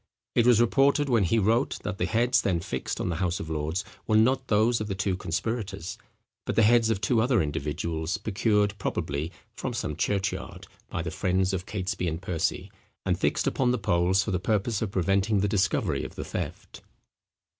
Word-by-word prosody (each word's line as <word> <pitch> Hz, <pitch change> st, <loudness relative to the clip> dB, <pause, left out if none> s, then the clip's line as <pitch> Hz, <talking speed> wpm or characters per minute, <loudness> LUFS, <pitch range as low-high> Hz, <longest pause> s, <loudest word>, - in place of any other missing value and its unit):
It 120 Hz, -1 st, +3 dB
was 120 Hz, -3 st, +6 dB
reported 140 Hz, +4 st, +3 dB
when 115 Hz, -6 st, +3 dB
he 100 Hz, +7 st, +2 dB
wrote, 115 Hz, +5 st, +2 dB
that 105 Hz, 0 st, -4 dB
the -, -, +1 dB
heads 120 Hz, +2 st, +2 dB
then 90 Hz, -4 st, +1 dB
fixed 65 Hz, -5 st, -4 dB
on -, -, -1 dB
the 85 Hz, -, -2 dB
House 90 Hz, -1 st, -1 dB
of 80 Hz, -, -6 dB
Lords 80 Hz, +4 st, -2 dB, 0.2 s
were 110 Hz, -, +4 dB
not 130 Hz, +4 st, +3 dB
those 110 Hz, +2 st, +3 dB
of 110 Hz, -, -3 dB
the 100 Hz, -, -3 dB
two 95 Hz, -1 st, 0 dB
conspirators, 100 Hz, +2 st, -3 dB, 0.4 s
but -, -, -3 dB
the 115 Hz, -, +5 dB
heads 115 Hz, +1 st, +5 dB
of 110 Hz, -4 st, +1 dB
two 110 Hz, +3 st, +2 dB
other 120 Hz, -1 st, +3 dB
individuals 80 Hz, +3 st, -2 dB
procured, 105 Hz, 0 st, +1 dB
probably, 75 Hz, -3 st, -2 dB, 0.2 s
from -, -, -4 dB
some 75 Hz, -, -3 dB
church 95 Hz, +4 st, 0 dB
yard, -, -, -8 dB, 0.2 s
by -, -, -3 dB
the -, -, -4 dB
friends 95 Hz, +1 st, 0 dB
of 95 Hz, +1 st, -3 dB
Catesby 90 Hz, -3 st, -2 dB
and 80 Hz, 0 st, -2 dB
Percy, 90 Hz, -3 st, -2 dB, 0.3 s
and -, -, +1 dB
fixed -, -, +1 dB
upon 130 Hz, -2 st, +1 dB
the 125 Hz, -, +2 dB
poles 95 Hz, -1 st, +2 dB
for 105 Hz, -, -3 dB
the 90 Hz, -, 0 dB
purpose 105 Hz, +2 st, 0 dB
of 110 Hz, -, -1 dB
preventing 100 Hz, +2 st, +1 dB
the 105 Hz, -, +2 dB
discovery 95 Hz, -2 st, +1 dB
of -, -, -7 dB
the -, -, -5 dB
theft. -, -, -6 dB
100 Hz, 200 wpm, -27 LUFS, 90-115 Hz, 0.4 s, was